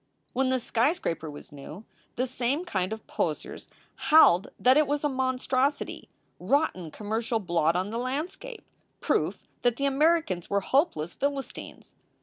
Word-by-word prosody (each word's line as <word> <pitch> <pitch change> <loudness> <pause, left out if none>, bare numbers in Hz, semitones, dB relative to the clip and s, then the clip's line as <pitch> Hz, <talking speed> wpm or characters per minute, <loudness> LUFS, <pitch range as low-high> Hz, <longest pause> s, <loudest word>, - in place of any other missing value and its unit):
"When 260 +1 +1
the 260 0 +2
skyscraper 230 - 0
was 145 - -10
new, 150 +8 -10 0.3
the 255 - 0
same 260 +6 -1
kind 185 - -1
of 220 0 -6
poseurs - - -3 0.4
howled 205 - +7
that 255 +1 +5
it 305 0 +4
was 290 +1 -1
a 295 - +2
monstrosity 260 +1 -1 0.3
rotten 275 - 0
commercial 220 +6 -2
blot 170 -5 +1
on 185 +3 -1
the 230 - -2
landscape 315 - -4 0.4
proof - - -1
that 245 -2 +2
the 280 - -1
Americans 280 - +2
were 200 0 +1
hopeless 190 - +1
Philistines. 280 -1 -5
255 Hz, 140 wpm, -27 LUFS, 190-280 Hz, 0.4 s, howled